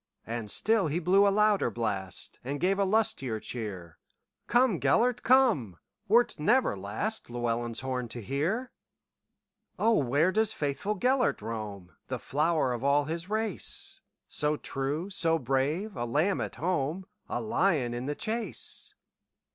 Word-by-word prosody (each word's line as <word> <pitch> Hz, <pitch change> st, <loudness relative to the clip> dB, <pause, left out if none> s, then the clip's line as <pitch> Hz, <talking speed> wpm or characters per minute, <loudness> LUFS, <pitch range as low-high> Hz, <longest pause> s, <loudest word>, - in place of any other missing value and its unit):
And 115 Hz, -2 st, -4 dB
still 215 Hz, -, +2 dB
he 150 Hz, +3 st, -1 dB
blew 190 Hz, +4 st, +4 dB
a -, -, +6 dB
louder 210 Hz, -, +3 dB
blast, 100 Hz, -5 st, -3 dB
And 140 Hz, +3 st, -3 dB
gave 195 Hz, +2 st, +1 dB
a 200 Hz, -, +3 dB
lustier 185 Hz, -, 0 dB
cheer:"Come, 115 Hz, -, -2 dB
Gêlert, 245 Hz, +1 st, +2 dB
come, 225 Hz, -, +3 dB, 0.3 s
wert 235 Hz, -1 st, +3 dB
never 235 Hz, -, +3 dB
lastLlewelyn's 120 Hz, -, -3 dB
horn 130 Hz, -2 st, -2 dB
to 120 Hz, -, -5 dB
hear."O, 190 Hz, -, -4 dB
where 145 Hz, +7 st, +2 dB
doth 220 Hz, +1 st, +1 dB
faithful 150 Hz, +9 st, -2 dB
Gêlert 255 Hz, +1 st, +2 dB
roam, 105 Hz, -5 st, -6 dB
The -, -, -2 dB
flower 150 Hz, -2 st, +1 dB
of 120 Hz, +1 st, -5 dB
all 140 Hz, +1 st, +4 dB
his 165 Hz, +4 st, -5 dB
race, 215 Hz, -2 st, -2 dB, 0.3 s
So 150 Hz, 0 st, 0 dB
true, 145 Hz, +9 st, -3 dB
so 165 Hz, -3 st, +2 dB
brave,—a 140 Hz, -, -1 dB
lamb 155 Hz, +11 st, +1 dB
at -, -, -4 dB
home,A 180 Hz, +5 st, -3 dB
lion 175 Hz, -, +1 dB
in 120 Hz, +2 st, -4 dB
the 145 Hz, -, -2 dB
chase?" 225 Hz, +5 st, -3 dB
155 Hz, 130 wpm, -29 LUFS, -, 0.3 s, a